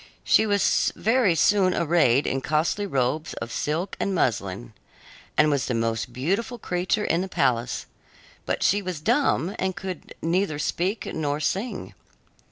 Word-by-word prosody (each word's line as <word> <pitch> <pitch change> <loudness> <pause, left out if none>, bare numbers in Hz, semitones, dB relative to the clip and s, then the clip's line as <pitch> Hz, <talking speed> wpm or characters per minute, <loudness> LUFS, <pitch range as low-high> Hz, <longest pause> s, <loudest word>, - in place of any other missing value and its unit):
She 220 - +4
was 205 -1 +2
very 225 -5 +2
soon 190 +2 +3
arrayed 150 -6 +3
in 135 - -1
costly 160 +8 0
robes 140 +1 -1
of 115 - -6
silk 165 +9 -2
and 195 - -1
muslin 100 - -1 0.6
and 150 0 +5
was 140 -2 0
the 125 - -1
most 115 +1 -1
beautiful 195 - -2
creature 185 +1 -1
in 170 - +1
the 190 - -3
palace; 120 -7 0 0.6
but - - -1
she 205 +2 +3
was 185 -5 -4
dumb 220 - +1
and 190 -1 -1
could 185 -3 -7
neither 170 -1 0
speak 180 +7 -1
nor 150 -2 -1
sing. 195 +9 -3
170 Hz, 150 wpm, -25 LUFS, 140-195 Hz, 0.6 s, and